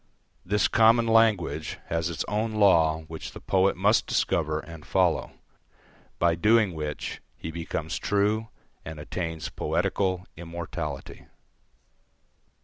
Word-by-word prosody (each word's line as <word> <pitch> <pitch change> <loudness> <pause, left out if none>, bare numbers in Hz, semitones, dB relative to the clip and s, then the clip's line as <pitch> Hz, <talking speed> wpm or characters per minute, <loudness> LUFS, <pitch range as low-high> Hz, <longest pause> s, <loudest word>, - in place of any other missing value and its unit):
This 105 +3 +2
common 115 +2 +5
language 110 -9 +2
has 80 0 -1
its 85 -2 -3
own 110 +2 -1
law 80 -7 +4
which 80 0 -8
the - - -9
poet 95 0 +2
must 105 +4 +3
discover 80 -2 0
and 80 -1 -10
follow, 65 - +1 0.8
by 85 -1 +3
doing 105 +2 +3
which 75 -2 -5 0.2
he 80 - -6
becomes 85 0 -4
true 105 +2 +1 0.4
and 80 -1 -8
attains 80 +1 -4
poetical 95 +3 -1
immortality. 85 -3 -6
85 Hz, 115 wpm, -26 LUFS, 80-105 Hz, 0.8 s, common